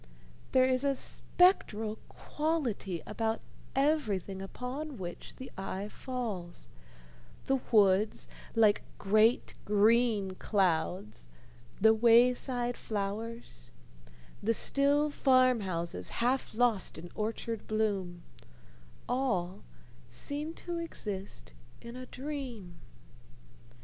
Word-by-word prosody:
There 260 -1 +5
is 255 0 +2
a 280 -1 +2
spectral 225 - +1
quality 255 - -2
about 225 +1 -1 0.4
everything 215 - 0
upon 255 +8 -5
which 175 -3 -7
the 260 - -9
eye 195 +1 -4
falls: 215 -10 -5 0.8
the 270 0 +2
woods, 205 -1 +3 0.3
like 215 -2 +4 0.2
great 215 +4 +3
green 210 -1 +3
clouds, 170 - -1 0.5
the 220 +2 +6
wayside 240 +2 +3
flowers, 210 - -5 0.7
the 225 +2 +2
still 285 +4 +3
farm 255 -3 +4
houses 170 - -3
half 245 -1 -1
lost 230 -4 +2
in 175 +2 -9
orchard 225 0 -3
bloom 195 -6 -1 0.8
all 230 -9 -1 0.5
seem 300 +3 -4
to 345 -1 -4
exist 195 - -5 0.3
in 235 +1 -9
a 255 0 -8
dream. 255 -9 -6
225 Hz, 95 wpm, -31 LUFS, 195-255 Hz, 0.8 s, the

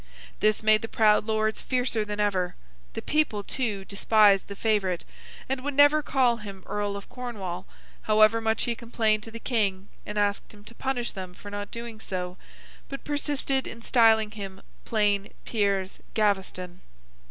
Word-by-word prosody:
This 215 0 +2
made 215 0 +5
the 225 - -4
proud 215 -2 +4
Lords 220 0 0
fiercer 250 -4 0
than 210 0 -5
ever; 190 -4 0 0.4
the - - -5
people, 295 -10 +1
too, 210 -5 -2
despised 200 0 +4
the 200 - -7
favourite, 200 -5 0 0.4
and 265 0 -1
would 290 0 -3
never 290 +2 +6
call 255 -5 +2
him 200 -4 -9
Earl 205 -1 -2
of 200 - -10
Cornwall, 200 -8 -6 0.3
however 215 +1 +4
much 220 0 +1
he 235 - 0
complained 225 -2 0
to 225 - -9
the 230 - -8
King 205 -6 -1
and 210 - -6
asked 205 +1 0
him 205 - -16
to 230 - -13
punish 245 -1 -2
them 185 -2 -7
for 205 - -10
not 205 0 -5
doing 235 -2 -7
so, 180 -3 -4 0.5
but 275 - -6
persisted 285 -2 -1
in 230 0 -9
styling 225 -3 +4
him 195 -3 -8 0.2
plain 205 -3 +1
Piers 200 -4 0 0.2
Gaveston. 190 -4 -1
215 Hz, 165 wpm, -27 LUFS, 200-235 Hz, 0.5 s, never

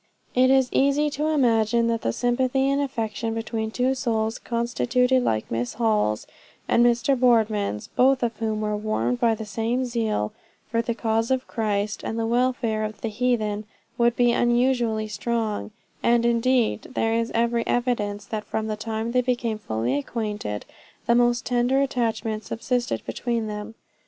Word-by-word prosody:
It 255 +1 +4
is 265 -1 +4
easy 285 +2 +2
to 300 +2 -1
imagine 235 -6 +3
that 230 -1 0
the 115 - 0
sympathy 255 - +1
and 280 +1 +1
affection 225 -4 -2
between 225 -1 -3
two 250 +3 +1
souls 225 -3 -1
constituted 245 +2 +1
like 110 - -1
Miss 120 +1 -2
Hall's 215 - +1 0.4
and 240 - +4
Mr. 240 +3 +3
Boardman's, 220 - +2
both 260 0 +3
of 230 -1 0
whom 220 -1 -2
were 210 0 -1
warmed 215 +3 -1
by 230 -2 +3
the 220 - -6
same 230 +5 -1
zeal 220 - -1 0.4
for 230 0 +2
the 235 0 -2
cause 225 0 0
of 260 0 0
Christ 210 -2 -1
and 225 - -3
the 225 - 0
welfare 235 -2 +1
of 215 0 -5
the 225 - -2
heathen, 215 -2 0 0.3
would 240 -1 +2
be 245 -1 +4
unusually 240 -2 +2
strong; 215 0 -2 0.3
and 235 0 +3
indeed 235 -1 +2
there 225 0 +1
is 230 0 0
every 235 0 +2
evidence, 210 -5 -1
that 215 0 -4
from 220 - -2
the 215 -1 -2
time 220 +1 -3
they 250 +1 +3
became 240 -3 -1
fully 115 - -1
acquainted, 210 - -4 0.4
the 235 - +3
most 240 +1 +3
tender 245 +2 +2
attachment 225 -5 -1
subsisted 245 +3 -2
between 235 -2 -2
them. 210 +1 -6
230 Hz, 160 wpm, -24 LUFS, 215-245 Hz, 0.4 s, It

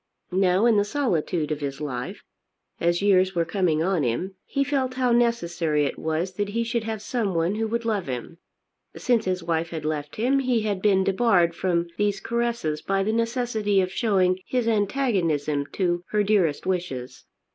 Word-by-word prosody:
Now 185 +2 +3
in 230 -3 +5
the 205 - +4
solitude 180 - -1
of 150 - -1
his 140 -1 -4
life, 125 -5 -5 0.6
as 170 +2 +1
years 190 -2 +3
were 170 -1 +2
coming 165 -3 +1
on 185 -2 +1
him, 145 +10 -1
he 275 - 0
felt 265 -2 -1
how 255 -1 +1
necessary 175 -11 +1
it - - -4
was 160 +4 -1
that 205 -1 -1
he 230 +3 -1
should 230 -1 -2
have 220 -2 -4
someone 195 -7 0
who 220 +1 -1
would 230 +1 -2
love 210 -7 -1
him. 130 +6 -6 0.6
Since 235 -3 +1
his 185 -2 -1
wife 165 0 -1
had 160 -3 -5
left 150 -1 -3
him 255 +5 +2
he 250 -4 +1
had 205 -3 -2
been 195 -2 +3
debarred 190 -4 +3
from 170 0 0
these 205 -1 +1
caresses 235 -10 -1
by 195 0 0
the 215 +2 0
necessity 230 -3 0
of 185 -1 0
showing 190 -4 +2
his 250 -2 0
antagonism 190 - 0
to 175 -2 0
her 210 -1 +2
dearest 195 -8 +1
wishes. 135 -9 -3
190 Hz, 180 wpm, -25 LUFS, 165-225 Hz, 0.6 s, in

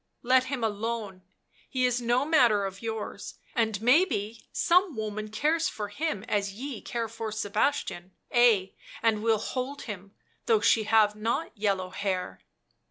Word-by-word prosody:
Let 255 +1 +4
him 260 -3 -3
alone, 215 -2 -3 0.5
he 255 -2 +1
is 245 0 +1
no 240 +3 +2
matter 240 -10 +4
of 195 0 -6
yours, 225 -2 -5 0.2
and 220 -4 0
maybe 230 - +2
some 360 -2 +3
woman 215 -1 -4
cares 305 +10 +1
for 210 -1 -5
him 245 -4 -3
as 200 -2 -1
ye 260 0 -6
care 235 -2 -3
for 225 0 -5
Sebastian, 210 -3 -1 0.2
ay, 230 -6 +4 0.3
and 220 -2 +2
will 225 0 +3
hold 260 +6 -4
him, 200 -2 -8 0.3
though 450 -2 +4
she 220 - +3
have 215 -1 +4
not 230 +9 -2
yellow 195 -3 -1
hair." 185 - -3
225 Hz, 150 wpm, -28 LUFS, 205-250 Hz, 0.5 s, Let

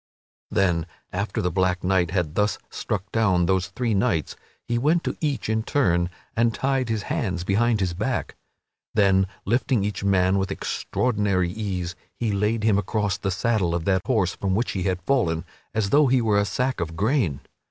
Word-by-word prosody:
Then 85 -4 +1 0.3
after 100 +1 -2
the 90 - 0
black 90 0 +1
knight 90 -2 +2
had 90 -4 -1
thus 105 +3 +1
struck 100 -2 -3
down 95 -6 +3
those 95 0 +1
three 120 -3 -1
knights 95 -6 0 0.3
he 120 0 0
went 160 +6 +2
to - - -2
each 145 -3 -1
in 110 0 +1
turn 90 -9 +1 0.3
and 115 -1 +2
tied 135 -2 0
his 110 -3 -1
hands 90 -5 -2
behind 110 +4 +2
his 90 -2 0
back. 110 +8 -2 0.6
Then, 95 -2 +4 0.2
lifting 120 0 +1
each 100 -1 -3
man 95 -1 +3
with 95 0 -1
extraordinary 100 -3 0
ease, 90 -4 -3 0.2
he 115 -3 -1
laid 105 +2 0
him 105 -2 +3
across 105 -1 -1
the 95 - -1
saddle 95 -3 +1
of 85 -2 -3
that 95 -2 +2
horse 100 -8 +2
from 95 -1 -1
which 115 +4 0
he 95 - -3
had 90 -2 -1
fallen, 90 -10 +1 0.3
as 105 -2 -1
though 145 0 +5
he 130 0 +4
were 110 -3 +2
a 100 - +2
sack 125 +5 -1
of 80 -1 -3
grain. 105 - +1
100 Hz, 185 wpm, -24 LUFS, 90-115 Hz, 0.6 s, though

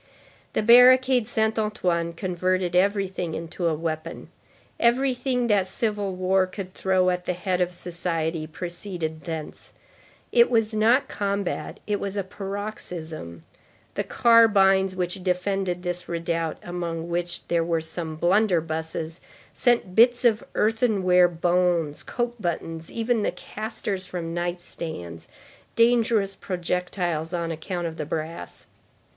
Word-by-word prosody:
The - - 0
barricade 250 +1 +7
Saint 220 -2 0
Antoine 175 -6 -1
converted 180 0 -1
everything 190 -3 +1
into 170 +2 -3
a 160 - +1
weapon; 160 +1 -5 0.5
everything 250 +1 +2
that 205 -5 +2
civil 205 -2 -2
war 185 +1 +2
could 185 0 -7
throw 185 -1 +2
at 180 0 -3
the 180 - 0
head 180 0 -1
of 180 0 +1
society 165 -2 -3
proceeded 170 -2 -5
thence; 160 -2 -6 0.6
it 235 0 +5
was 225 -2 +2
not 235 +6 +3
combat, 200 -3 -3
it 205 -1 -1
was 200 0 -4
a 200 - 0
paroxysm; 185 - -6 0.5
the - - -1
carbines 195 -5 +4
which 180 +1 -3
defended 180 0 -1
this 175 -1 -3
redoubt, 165 -1 -2
among 170 -2 -4
which 175 0 -3
there 170 -1 +1
were 165 0 0
some 160 0 -5
blunderbusses, 165 -3 0 0.3
sent 240 -7 +2
bits 240 +4 +5
of 225 -2 +3
earthenware 205 -5 +3
bones, 175 -2 +1
coat 240 -1 -3
buttons, 165 -2 -4
even 230 0 0
the - - 0
casters 195 0 -4
from 170 -2 -5
night 175 +1 -2
stands, 85 - -6 0.5
dangerous 230 -4 +3
projectiles 180 -2 -2
on 170 -1 -2
account 175 +2 -4
of 165 -1 -5
the 155 - -3
brass. 155 - -5
180 Hz, 130 wpm, -25 LUFS, 170-210 Hz, 0.6 s, barricade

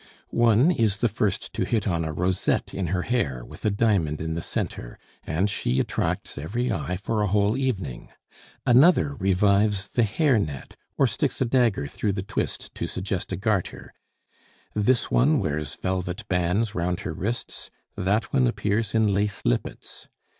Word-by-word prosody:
One 120 +7 +4
is 110 - +1
the 120 - +2
first 105 -3 -2
to - - -1
hit 110 -4 0
on 85 -3 0
a 80 - -2
rosette 90 +4 0
in 95 -2 -2
her 90 +1 -1
hair 70 - -1
with - - -13
a - - +4
diamond 100 -8 +1
in 80 0 -3
the 85 - -3
centre, - - -4 0.3
and 85 +6 +1
she 65 -10 -1
attracts - - -2
every 120 +12 -2
eye 90 +1 -2
for 105 +3 -1
a 105 - +2
whole 105 +2 +2
evening; 105 - -3 0.6
another 140 +4 +5
revives 100 -1 +2
the 120 - +1
hair 125 +3 +3
net, 75 -8 -5 0.2
or - - +5
sticks - - -1
a 130 - +2
dagger 120 - +2
through 100 +8 -2
the 95 -1 -3
twist 100 - -4
to - - -3
suggest 95 0 -4
a 90 - -2
garter; 100 -2 -2 0.8
this 115 +4 +1
one 150 +5 +4
wears 75 - -2
velvet 95 +2 -3
bands 95 +4 +1
round 90 +2 -1
her 85 - -4
wrists, 110 +9 -4 0.3
that 105 +4 0
one 130 -2 +4
appears 105 -1 -1
in 110 -2 +3
lace 105 +1 -1
lippets. - - -3
100 Hz, 170 wpm, -25 LUFS, 90-115 Hz, 0.8 s, another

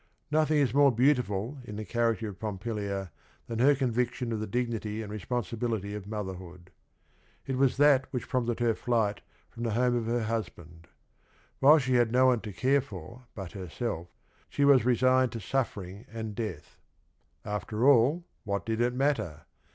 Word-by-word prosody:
No 155 0 +3
thing 155 0 +1
is 135 -5 +2
more 140 0 +6
beautiful 125 -1 +1
in 105 -4 -8
the 110 +1 -5
character 115 +1 0
of 100 -2 -8
Pompilia 100 -2 -4 0.3
than 115 -1 -4
he 130 - +5
r 145 - +6
convict 125 -2 0
ion_of 115 -4 -3
the_dignity 110 -1 -2
and 105 - -8
responsibility 110 -1 -3
oFmo 105 0 -5
therhoo 90 -2 -9
d. 90 - -24 0.7
It 135 - -2
was 135 0 +2
that 140 -2 +5
which 125 - -4
prompted 120 -3 -1
her 115 -2 +2
night 110 -4 +1 0.3
from 115 - -10
the 115 -2 -1
home 125 0 +2
of 115 -2 -1
her 120 0 0
hus 110 0 -1
band. 85 0 -16 0.7
While 145 +4 +7
she 130 -3 0
had 120 -2 +3
no 130 +2 +4
one 125 -3 +3
to 105 - -6
care 135 +7 +2
for 120 - -11
but 95 -4 -7
herself, 90 -1 -4 0.4
she 145 - +1
was 135 -4 +6
resigned 130 0 +3
to 115 - -4
suffering 105 -3 -3
and 110 -2 -5
death. 105 -9 -6 0.7
After 105 +4 -1
all, 140 +6 +4 0.2
what 100 -2 -2
did 110 0 -1
it 120 +1 +1
matter? 130 - 0
115 Hz, 175 wpm, -29 LUFS, 105-130 Hz, 0.7 s, While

